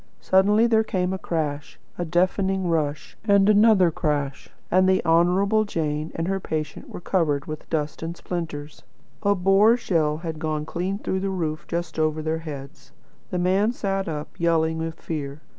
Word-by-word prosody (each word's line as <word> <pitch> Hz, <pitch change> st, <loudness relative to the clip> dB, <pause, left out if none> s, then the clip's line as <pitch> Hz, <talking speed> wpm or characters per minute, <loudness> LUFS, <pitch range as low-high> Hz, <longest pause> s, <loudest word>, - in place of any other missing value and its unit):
Suddenly 205 Hz, +4 st, +4 dB
there 220 Hz, -2 st, +3 dB
came 185 Hz, -3 st, -1 dB
a 190 Hz, -, -4 dB
crash 150 Hz, -5 st, -3 dB, 0.2 s
a 175 Hz, -, -3 dB
deafening 185 Hz, +2 st, +1 dB
rush 150 Hz, -3 st, -1 dB
and 200 Hz, -2 st, +4 dB
another 210 Hz, -4 st, +5 dB
crash, 145 Hz, -4 st, -2 dB, 0.2 s
and 185 Hz, +1 st, +4 dB
the 190 Hz, -, +2 dB
Honourable 185 Hz, +6 st, +3 dB
Jane 155 Hz, -5 st, -2 dB
and 165 Hz, +1 st, -2 dB
her 195 Hz, 0 st, 0 dB
patient 155 Hz, -4 st, -4 dB
were -, -, -7 dB
covered 160 Hz, -6 st, 0 dB
with 155 Hz, -1 st, -7 dB
dust 150 Hz, -2 st, -2 dB
and 165 Hz, +1 st, -5 dB
splinters. 160 Hz, -4 st, -5 dB, 0.4 s
A 200 Hz, -1 st, +3 dB
Boer 195 Hz, +5 st, +4 dB
shell 160 Hz, -9 st, 0 dB
had 160 Hz, -1 st, -5 dB
gone 155 Hz, -1 st, -2 dB
clean 180 Hz, +5 st, -2 dB
through 190 Hz, -2 st, -2 dB
the 195 Hz, +1 st, -2 dB
roof 160 Hz, -4 st, -3 dB
just 170 Hz, -2 st, -3 dB
over 155 Hz, 0 st, 0 dB
their 160 Hz, +1 st, -1 dB
heads. 145 Hz, -1 st, -9 dB, 0.4 s
The 180 Hz, -, -2 dB
man 190 Hz, +6 st, +2 dB
sat 195 Hz, -4 st, -2 dB
up, 150 Hz, -2 st, -4 dB
yelling 160 Hz, -1 st, +1 dB
with 160 Hz, 0 st, -4 dB
fear. 145 Hz, -2 st, -5 dB
170 Hz, 170 wpm, -24 LUFS, 155-190 Hz, 0.4 s, another